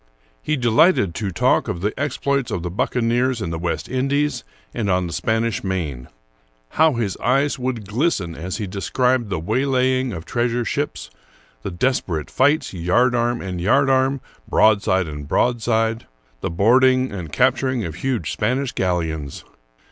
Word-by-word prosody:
He 155 0 -1
delighted 120 - +3
to 105 +1 -3
talk 85 - +2
of 85 - -4
the 105 +2 -1
exploits 140 -2 -1
of 85 - -3
the 90 - -4
buccaneers 120 +5 0
in 85 -6 -3
the 80 - -3
West 85 0 -3
Indies 135 0 0 0.3
and 105 -3 -2
on 90 -1 +1
the 85 - -5
Spanish 115 -1 -1
Main.^ 80 -10 -3 0.6
How 160 -1 +3
his 115 -6 -2
eyes 135 +5 +1
would 125 -5 -3
glisten 105 - 0
as 90 +3 -5
he 110 - -3
described 120 +5 0
the 95 - -1
way 110 +11 -1
laying 130 -1 +1
of 85 -5 -7
treasure 120 0 -1
ships; - - -3 0.5
the - - -4
desperate 85 - -1
fights, 145 0 +2
yardarm 120 +7 +1
and 90 -2 -5
yardarm,^ 135 +5 +2 0.3
broadside 100 -4 +3
and 75 -2 -7
broadside; 115 +1 +1
^ - - -21 0.4
the - - -2
boarding 130 +8 +3
and 90 -6 -6
cap 130 - +3
turing 125 - -2
huge 120 - -2
Spanish 125 +5 -1
galleons 80 -6 -2
115 Hz, 155 wpm, -21 LUFS, 90-130 Hz, 0.6 s, delighted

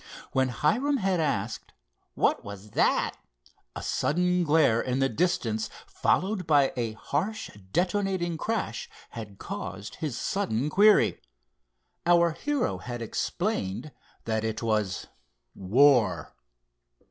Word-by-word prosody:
When 130 0 +2
Hiram 245 - +1
had 190 -5 +1
asked: 115 -9 -2 0.4
"What - - +2
was 100 +1 -9
that?" - - +2 0.6
a - - -5
sudden 180 +3 +1
glare 145 -7 +4
in 125 0 -1
the 135 0 +2
distance 115 -7 0 0.2
followed 190 -1 0
by 145 -3 +4
a 115 -3 -2
harsh, 185 - -3 0.2
detonating 185 - 0
crash 160 - -3 0.2
had 105 -4 -8
caused 100 +3 -6
his 145 -7 -3
sudden 150 - -1
query. 210 +3 +5 0.9
Our 170 -1 +5
hero 285 - -1
had 120 -1 -5
explained 150 - -2 0.3
that 110 -1 -1
it 110 0 -3
was 105 -4 0 0.5
"War." 125 +5 +3
145 Hz, 110 wpm, -27 LUFS, 110-180 Hz, 0.9 s, query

